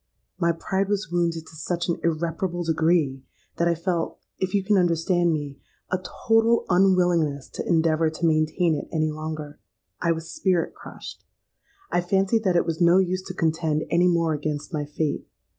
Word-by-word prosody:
My 170 Hz, -2 st, +3 dB
pride 190 Hz, +4 st, -2 dB
was 205 Hz, -4 st, -1 dB
wounded 170 Hz, -2 st, 0 dB
to 160 Hz, -, -14 dB
such 170 Hz, +3 st, -2 dB
an 170 Hz, -, -1 dB
irreparable 170 Hz, +2 st, -1 dB
degree, 160 Hz, -4 st, +1 dB, 0.4 s
that 170 Hz, -, +2 dB
I 170 Hz, -, +2 dB
felt, 170 Hz, 0 st, -2 dB, 0.2 s
if 185 Hz, -1 st, -1 dB
you 200 Hz, -, +2 dB
can 205 Hz, +2 st, +2 dB
understand 175 Hz, -1 st, +2 dB
me, 145 Hz, -3 st, -4 dB, 0.3 s
a 185 Hz, -, +1 dB
total 225 Hz, +4 st, +2 dB
unwillingness 175 Hz, -6 st, +2 dB
to -, -, -6 dB
endeavour 160 Hz, -1 st, +2 dB
to 160 Hz, +2 st, -3 dB
maintain 155 Hz, +2 st, +2 dB
it 145 Hz, -, -3 dB
any 155 Hz, -2 st, 0 dB
longer. 155 Hz, -1 st, -6 dB, 0.4 s
I 170 Hz, -, +2 dB
was 165 Hz, 0 st, -7 dB
spirit 185 Hz, -, 0 dB
crushed. -, -, -10 dB, 0.7 s
I 175 Hz, -, +2 dB
fancied 195 Hz, +5 st, +1 dB
that 185 Hz, -2 st, +2 dB
it 170 Hz, -, +3 dB
was 165 Hz, +1 st, -3 dB
no 170 Hz, +1 st, +6 dB
use 185 Hz, 0 st, +1 dB
to 185 Hz, -, -6 dB
contend 160 Hz, -2 st, 0 dB
any 175 Hz, +1 st, +4 dB
more 170 Hz, -2 st, +2 dB
against 150 Hz, +2 st, -4 dB
my 150 Hz, -1 st, -1 dB
fate. 150 Hz, +1 st, -3 dB
170 Hz, 175 wpm, -24 LUFS, 155-180 Hz, 0.7 s, no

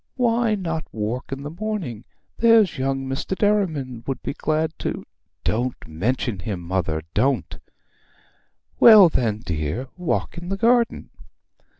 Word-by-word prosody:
Why 235 Hz, -3 st, +2 dB
not 165 Hz, -5 st, -3 dB
walk 115 Hz, +5 st, -4 dB
in 135 Hz, +1 st, -5 dB
the 145 Hz, -, -6 dB
morning? 175 Hz, -, -4 dB, 0.3 s
There's 225 Hz, -, +4 dB
young 135 Hz, 0 st, -1 dB
Mr. 135 Hz, +8 st, -3 dB
Derriman 155 Hz, -, 0 dB
would 135 Hz, -, -3 dB
be -, -, -3 dB
glad 155 Hz, +1 st, -1 dB
to -, -, -4 dB, 0.2 s
' -, -, -53 dB
'Don't 120 Hz, +3 st, 0 dB
mention 100 Hz, +6 st, -2 dB
him, 95 Hz, 0 st, -4 dB
mother, 85 Hz, -3 st, -2 dB
don't!' 135 Hz, -2 st, 0 dB, 1.2 s
'Well 210 Hz, -6 st, +9 dB
then, 110 Hz, -7 st, 0 dB
dear, 80 Hz, -, -3 dB
walk 180 Hz, -1 st, -2 dB
in 175 Hz, +1 st, -8 dB
the 195 Hz, -, -2 dB
garden.' 235 Hz, +2 st, +2 dB
140 Hz, 135 wpm, -23 LUFS, -, 1.2 s, Well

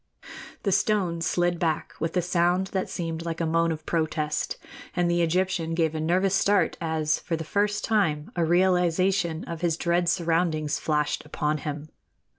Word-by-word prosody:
The 200 Hz, -, +1 dB
stone 190 Hz, -4 st, +1 dB
slid 175 Hz, +1 st, +1 dB
back 160 Hz, -3 st, -1 dB
with 165 Hz, +3 st, -2 dB
a 180 Hz, -, +2 dB
sound 180 Hz, +2 st, +1 dB
that 190 Hz, -1 st, -1 dB
seemed 165 Hz, -1 st, -4 dB
like 165 Hz, -1 st, -4 dB
a 165 Hz, -, 0 dB
moan 165 Hz, +1 st, +2 dB
of 155 Hz, -1 st, -5 dB
protest, 155 Hz, -2 st, -1 dB, 0.4 s
and 175 Hz, -1 st, +2 dB
the 175 Hz, 0 st, +2 dB
Egyptian 170 Hz, -1 st, 0 dB
gave 160 Hz, -2 st, +1 dB
a 160 Hz, -, -3 dB
nervous 185 Hz, +4 st, +2 dB
start 200 Hz, 0 st, +2 dB
as, 160 Hz, -2 st, 0 dB
for 165 Hz, -, -3 dB
the 160 Hz, -, -4 dB
first 205 Hz, +5 st, 0 dB
time, 165 Hz, -9 st, 0 dB
a 170 Hz, -, +1 dB
realization 180 Hz, 0 st, +2 dB
of 170 Hz, -1 st, -6 dB
his 170 Hz, -2 st, +1 dB
dread 175 Hz, 0 st, +1 dB
surroundings 165 Hz, -3 st, 0 dB
flashed 150 Hz, -1 st, 0 dB
upon 150 Hz, 0 st, -2 dB
him. 150 Hz, +1 st, -5 dB
170 Hz, 170 wpm, -26 LUFS, 160-180 Hz, 0.4 s, a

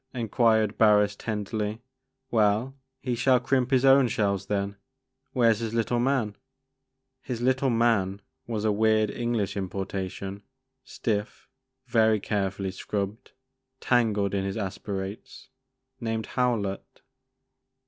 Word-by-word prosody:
'' -, -, -45 dB
enquired 110 Hz, -2 st, +2 dB
Barris 105 Hz, -2 st, +5 dB
tenderly; 105 Hz, +1 st, -3 dB, 0.5 s
"well, 110 Hz, +4 st, +2 dB, 0.3 s
he 125 Hz, -, -1 dB
shall 125 Hz, +2 st, +3 dB
crimp 130 Hz, 0 st, +1 dB
his 130 Hz, -1 st, +3 dB
own 135 Hz, -1 st, +6 dB
shells 100 Hz, -4 st, -1 dB
then, 100 Hz, -1 st, -2 dB, 0.3 s
— 130 Hz, +1 st, -53 dB
where 115 Hz, -3 st, +4 dB
's 105 Hz, -, -7 dB
his 115 Hz, -1 st, -3 dB
little 115 Hz, +1 st, +1 dB
man? 120 Hz, -5 st, +1 dB, 0.4 s
*' 130 Hz, 0 st, -54 dB
His 125 Hz, -3 st, -4 dB
little 130 Hz, +2 st, +2 dB
man," 115 Hz, -5 st, +2 dB, 0.3 s
was 110 Hz, -2 st, -2 dB
a 110 Hz, -, +3 dB
weird 110 Hz, 0 st, +2 dB
English 120 Hz, -4 st, -1 dB
impor 95 Hz, -1 st, -3 dB
tation, 95 Hz, +1 st, -5 dB, 0.4 s
stiff, 105 Hz, -1 st, -3 dB, 0.4 s
very 110 Hz, -3 st, +3 dB
carefully 95 Hz, -2 st, -2 dB
scrubbed, 100 Hz, +3 st, -4 dB, 0.5 s
tangled 105 Hz, -5 st, +1 dB
in 100 Hz, -1 st, 0 dB
his 95 Hz, +1 st, -3 dB
aspirates, 95 Hz, 0 st, -5 dB, 0.5 s
named 110 Hz, -2 st, -2 dB
Howlett. 115 Hz, -6 st, -2 dB
110 Hz, 130 wpm, -27 LUFS, 100-120 Hz, 0.5 s, own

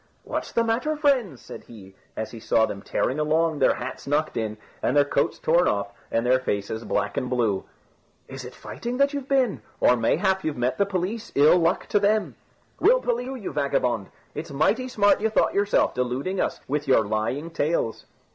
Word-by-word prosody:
"What's -, -, -4 dB
the 230 Hz, -, +2 dB
matter, 240 Hz, +7 st, 0 dB
friends?" 260 Hz, -, +1 dB
said -, -, -10 dB
he, 95 Hz, -5 st, -13 dB, 0.2 s
as 110 Hz, -, -4 dB
he 115 Hz, -, -9 dB
saw 110 Hz, 0 st, +2 dB
them 100 Hz, -, -6 dB
tearing 130 Hz, +7 st, -1 dB
along, 155 Hz, 0 st, +1 dB
their 135 Hz, -, +4 dB
hats 125 Hz, +2 st, -7 dB
knocked 150 Hz, +2 st, 0 dB
in, 110 Hz, -1 st, -3 dB, 0.2 s
and 135 Hz, -, +1 dB
their 145 Hz, -, +5 dB
coats 140 Hz, -, 0 dB
torn 170 Hz, +3 st, +3 dB
off, 100 Hz, 0 st, -1 dB, 0.2 s
and 115 Hz, +1 st, 0 dB
their 130 Hz, +1 st, +4 dB
faces 110 Hz, -2 st, -3 dB
black 105 Hz, -2 st, -2 dB
and 125 Hz, -, -1 dB
blue. 115 Hz, -6 st, 0 dB, 0.6 s
"Is -, -, -8 dB
it -, -, -10 dB
fighting 245 Hz, +2 st, -6 dB
you've 280 Hz, -2 st, -5 dB
been? 265 Hz, -6 st, +1 dB, 0.2 s
or 125 Hz, -, +5 dB
mayhap 190 Hz, -, +1 dB
you 155 Hz, -2 st, -2 dB
met 125 Hz, +6 st, -1 dB
the 200 Hz, -, +3 dB
police, 200 Hz, +4 st, -3 dB
ill 150 Hz, +5 st, +6 dB
luck 165 Hz, 0 st, +1 dB
to 205 Hz, -, +3 dB
them?" 210 Hz, +1 st, +1 dB, 0.5 s
"We'll -, -, +5 dB
police 245 Hz, -, -2 dB
you, 265 Hz, -, -5 dB
you 220 Hz, -7 st, -6 dB
vagabond. 125 Hz, -7 st, 0 dB, 0.2 s
It's -, -, -6 dB
mighty 180 Hz, -, +1 dB
smart 205 Hz, -5 st, +3 dB
you 220 Hz, -, +2 dB
thought 220 Hz, -, +2 dB
yourself, 200 Hz, 0 st, +2 dB
deluding 130 Hz, +10 st, -1 dB
us -, -, -2 dB
with 150 Hz, +1 st, -2 dB
your 120 Hz, -5 st, +4 dB
lying 110 Hz, +10 st, -2 dB
tales." 145 Hz, -9 st, -1 dB
150 Hz, 195 wpm, -25 LUFS, -, 0.6 s, ill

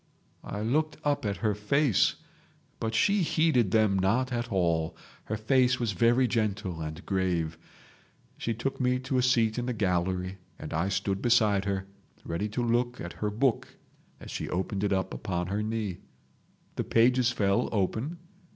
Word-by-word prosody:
I 105 Hz, -, -5 dB
looked 150 Hz, +8 st, 0 dB
up 145 Hz, -6 st, 0 dB
at 100 Hz, -, -2 dB
her 105 Hz, -, +3 dB
face, 110 Hz, +3 st, +2 dB, 0.6 s
but 110 Hz, 0 st, -2 dB
she 200 Hz, -, +3 dB
heeded 155 Hz, -, +2 dB
them 105 Hz, -2 st, +3 dB
not 120 Hz, +8 st, +1 dB
at 120 Hz, 0 st, -2 dB
all. 85 Hz, -3 st, 0 dB, 0.3 s
Her 110 Hz, -, -3 dB
face 130 Hz, +3 st, +3 dB
was 115 Hz, -3 st, 0 dB
very 120 Hz, +6 st, +3 dB
gentle 100 Hz, -7 st, -1 dB
and 80 Hz, +3 st, -6 dB
grave. 90 Hz, -4 st, 0 dB, 0.8 s
She 115 Hz, -, -3 dB
took 135 Hz, +4 st, -3 dB
me 125 Hz, 0 st, +2 dB
to 130 Hz, 0 st, -1 dB
a -, -, +3 dB
seat 120 Hz, -2 st, +2 dB
in 120 Hz, -, -3 dB
the 125 Hz, -, 0 dB
gallery, 90 Hz, -2 st, -1 dB, 0.2 s
and 75 Hz, -, -7 dB
I 85 Hz, +5 st, 0 dB
stood 95 Hz, 0 st, -1 dB
beside 110 Hz, -5 st, +3 dB
her, 95 Hz, -1 st, -1 dB, 0.4 s
ready 90 Hz, +6 st, -2 dB
to 120 Hz, +4 st, -2 dB
look 120 Hz, +1 st, 0 dB
at 85 Hz, -, -6 dB
her 105 Hz, -, -2 dB
book 115 Hz, +4 st, 0 dB, 0.4 s
as -, -, -9 dB
she -, -, -4 dB
opened 95 Hz, +2 st, -2 dB
it 105 Hz, -, +1 dB
upon 95 Hz, -2 st, -1 dB
her 100 Hz, +2 st, -1 dB
knee. 105 Hz, -4 st, -3 dB, 0.8 s
The -, -, 0 dB
pages 125 Hz, +1 st, +3 dB
fell 100 Hz, -5 st, +1 dB
open. 110 Hz, -, -1 dB
110 Hz, 165 wpm, -28 LUFS, 95-125 Hz, 0.8 s, her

